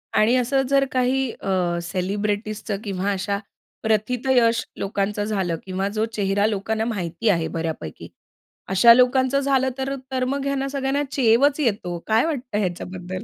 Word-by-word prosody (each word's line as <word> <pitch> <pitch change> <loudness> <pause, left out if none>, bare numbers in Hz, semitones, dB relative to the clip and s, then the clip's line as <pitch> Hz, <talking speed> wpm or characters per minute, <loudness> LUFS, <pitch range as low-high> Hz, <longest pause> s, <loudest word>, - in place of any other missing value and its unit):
आणि 225 +4 +4
असं 260 +2 +2
जर 275 0 +4
काही 255 0 +1
अ, 180 -3 0
सेलिब्रिटीजचं 205 +4 -2
किंवा 195 -1 -2
अशा 200 +1 -1 0.5
प्रथितयश 230 +2 +2 0.2
लोकांचं 200 +1 -1
झालं 195 -5 -1
किंवा 190 +1 -2
जो 215 - +1
चेहरा 200 -1 +1
लोकांना 220 +1 -1
माहिती 200 -1 -2
आहे 165 -4 +2
बऱ्यापैकी 160 - -5 0.6
अशा 195 +5 +7
लोकांचं 260 +2 +3
झालं 270 -1 +2
तर 270 +1 -2 0.2
तर 255 -1 0
मग 275 +1 -2
ह्यांना 275 -1 -1
सगळ्यांना 275 +1 -1
चेवच 270 +3 +3
येतो. 200 - -1
काय 225 +6 +3
वाटतं 255 -9 -3
ह्याच्याबद्दल? 185 -1 -4
220 Hz, 140 wpm, -23 LUFS, 195-260 Hz, 0.6 s, अशा